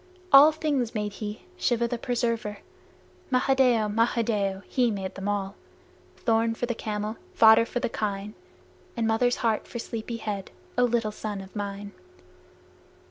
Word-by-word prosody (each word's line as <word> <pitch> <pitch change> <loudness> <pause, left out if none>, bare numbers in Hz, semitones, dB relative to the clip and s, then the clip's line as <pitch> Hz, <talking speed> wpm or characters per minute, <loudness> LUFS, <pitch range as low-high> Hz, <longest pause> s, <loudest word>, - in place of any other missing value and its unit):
All 285 +3 +10
things 290 -7 -1
made 210 -1 -2
he 210 0 -5
Shiva 235 -1 +1
the 235 0 -3
Preserver. 230 -4 -1 0.7
Mahadeo! 255 -3 +3
Mahadeo! 210 -3 0
He 250 -3 +2
made 195 -3 -3 0.2
all, 200 -1 -1 0.6
Thorn 225 0 +1
for 245 - -2
the 240 - -2
camel, 215 -1 -4 0.2
fodder 225 +1 +7
for 245 - -2
the - - +1
kine, 205 -2 -3 0.6
And 230 - +1
mother's 235 +2 +2
heart 220 -2 +1
for - - -7
sleepy 230 0 -5
head, 205 -4 -4 0.3
O 245 - +4
little 235 -3 0
son 210 -1 -5
of 190 +1 -11
mine! 200 0 -5
225 Hz, 140 wpm, -26 LUFS, 210-240 Hz, 0.7 s, All